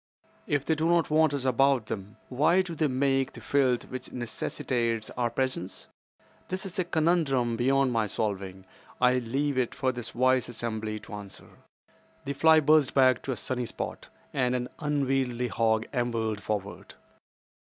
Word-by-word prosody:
If 145 -2 0
they 160 - +2
do 160 +1 0
not 170 -2 +2
want 155 -1 +4
us 140 -2 -3
about 130 -1 +3
them, 100 -1 -6
why 155 +8 +3
do 175 -2 -6
they 155 -1 +1
make 135 0 +1
the - - -10
filth 130 -4 +1
which 130 - -7
necessitates 115 -1 -2
our 120 -1 -1
presence? 125 -6 -3 0.6
That 185 +2 -3
is 190 +1 -5
a - - +3
conundrum 155 -8 +1
beyond 135 +2 +2
my 115 -2 +1
solving. 95 -2 -3 0.3
I 125 0 +4
leave 135 +3 -1
it 125 - -1
for 130 -1 0
this 120 -2 -6
wise 130 0 +2
assembly 110 -2 -3
to 110 - -12
answer." 100 -2 -9 0.8
The 140 - -2
fly 160 +2 +6
buzzed 150 -2 +4
back 130 -2 +5
to 135 - -4
a 125 - -3
sunny 125 +1 -3
spot, - - -6 0.3
and 125 -2 +1
an 125 0 -2
unwieldy 135 -4 0
hog 110 0 +1
ambled 115 -4 -1
forward. 105 -2 -5
130 Hz, 165 wpm, -28 LUFS, 115-140 Hz, 0.8 s, fly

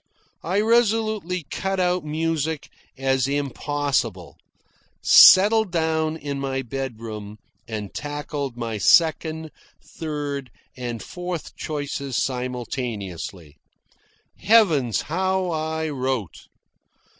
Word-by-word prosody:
I 185 +4 0
resolutely 215 -5 +1
cut 195 0 -2
out 180 0 +1
music 160 0 -2 0.3
as 135 -1 +1
impossible, 145 0 -1 0.7
settled 210 +1 +8
down 160 -1 0
in 140 -2 -4
my 135 -1 -2
bedroom, 115 -5 -6 0.3
and 105 -3 -5
tackled 145 -3 -4
my 115 -3 -3
second, 160 - +3 0.3
third, 145 -4 -5 0.3
and 120 -3 -5
fourth 180 -2 -6
choices 145 -3 -4
simultaneously. 115 - -4 0.8
Heavens, 160 - +4
how 185 +2 0
I 160 0 -2
wrote! 130 - -3
145 Hz, 85 wpm, -23 LUFS, 125-165 Hz, 0.8 s, settled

